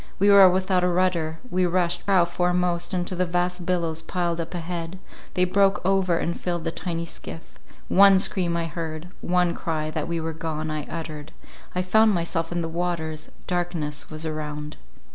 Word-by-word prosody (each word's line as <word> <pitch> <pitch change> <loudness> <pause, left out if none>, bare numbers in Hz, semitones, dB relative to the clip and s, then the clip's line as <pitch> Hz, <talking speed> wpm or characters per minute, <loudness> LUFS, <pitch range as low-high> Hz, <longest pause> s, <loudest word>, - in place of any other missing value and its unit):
We 200 +1 +5
were 195 -2 +9
without 185 0 +1
a - - +3
rudder—we 180 +2 0
rushed 175 +1 0
prow 190 -3 +5
foremost 175 0 0
into 180 0 -2
the 180 0 0
vast 180 0 -1
billows 165 -3 0
piled 170 -2 -1
up 165 +2 -6
a - - -2
head— 170 +1 -5 0.4
they 180 - +3
broke 195 +2 +3
over 190 -3 +2
and 170 0 -2
filled 175 -2 -2
the 165 - -1
tiny 170 -1 -3
skiff; 165 0 -10 0.3
one 195 0 +7
scream 180 -3 +1
I 170 - -1
heard—one 170 +2 -2
cry 155 -2 -3
that 155 -1 -3
we 170 0 -2
were 160 0 -3
gone, 155 -1 -3
I 150 -1 -4
uttered; 155 -2 -6 0.4
I 180 - +1
found 220 +3 +4
myself 165 -1 -2
in 175 0 -1
the 165 - -2
waters; 165 -2 -3 0.2
darkness 170 -4 -2
was 155 +1 -4
around. 150 -1 -5
175 Hz, 175 wpm, -25 LUFS, 160-180 Hz, 0.4 s, were